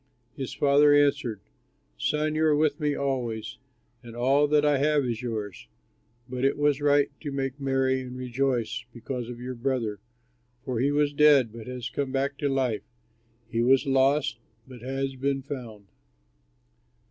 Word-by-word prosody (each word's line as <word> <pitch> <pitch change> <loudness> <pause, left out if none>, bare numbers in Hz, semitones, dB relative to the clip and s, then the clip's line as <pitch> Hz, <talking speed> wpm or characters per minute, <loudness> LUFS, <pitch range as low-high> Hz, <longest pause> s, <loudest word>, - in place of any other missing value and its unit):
His 135 -3 -5
father 145 +1 +4
answered, 135 -7 +2 0.5
'Son, 150 +1 0
you 155 +1 +1
are 155 -1 +4
with 150 -1 +1
me 150 -1 0
always 125 -6 -3 0.4
and 120 -2 -11
all 135 +4 +3
that 150 0 +3
I 145 -2 +3
have 150 -1 +2
is 120 -1 -2
yours; 110 -5 -5 0.6
but 125 0 -4
it 135 - +2
was 145 -1 +2
right 145 -1 +3
to 145 - -5
make 135 0 -3
merry 135 -1 +1
and 125 0 -8
rejoice 125 -2 -1
because 120 0 -5
of 120 -1 -7
your 125 +1 -5
brother, 120 -4 -2 0.7
for 125 -5 -2
he 135 +3 +2
was 145 0 +1
dead 140 -6 +5
but 115 0 -9
has 125 -2 -5
come 135 +2 -3
back 140 +1 -1
to 145 -2 0
life, 130 -5 0 0.7
he 115 0 -1
was 130 +4 +4
lost 135 -2 +2 0.3
but 125 -3 -12
has 135 +1 -3
been 135 +1 -1
found.'" 120 -7 -8
135 Hz, 160 wpm, -27 LUFS, 125-145 Hz, 0.7 s, dead